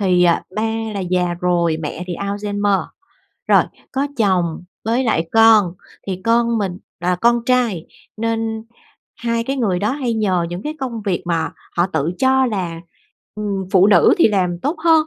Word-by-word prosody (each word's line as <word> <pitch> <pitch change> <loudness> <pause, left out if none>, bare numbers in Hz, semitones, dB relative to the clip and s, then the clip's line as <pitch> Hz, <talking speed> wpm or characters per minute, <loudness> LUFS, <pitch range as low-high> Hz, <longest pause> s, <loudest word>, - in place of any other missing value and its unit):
thì, 180 -3 +3
ờ, 170 -1 +5 0.2
ba 215 - 0 0.3
là 200 - -2
già 180 -1 0
rồi, 170 -2 +1
mẹ 160 +3 -5
thì 175 - -4
Alzheimer. 205 -1 -1 0.6
Rồi, - - +6 0.3
có 275 +2 0
chồng 180 -7 +1 0.2
với 235 +4 +1
lại 165 -8 0
con, 225 -5 +6 0.3
thì 185 -1 -4
con 235 0 +2
mình 190 -3 -2 0.2
là 180 +1 +1
con 235 +4 +2
trai 240 -10 +1 0.3
nên 225 0 -2 0.5
hai 230 -1 -1
cái 270 +3 -2
người 200 -8 0
đó 205 +2 0
hay 255 -5 -2
nhờ 190 -6 +1
những 175 +2 -5
cái 305 +4 -4
công 240 -4 -4
việc 185 -4 -1
mà 165 -2 0 0.3
họ 175 +1 +3
tự 160 -2 -1
cho 265 0 +3
là, 180 -7 -3 0.5
ừm, 205 -2 -3
phụ 190 -1 +6
nữ 205 - +5
thì 335 - +6
làm 185 -4 0
tốt 300 +5 -1
hơn. 320 -2 +5
205 Hz, 175 wpm, -19 LUFS, 180-230 Hz, 0.6 s, Rồi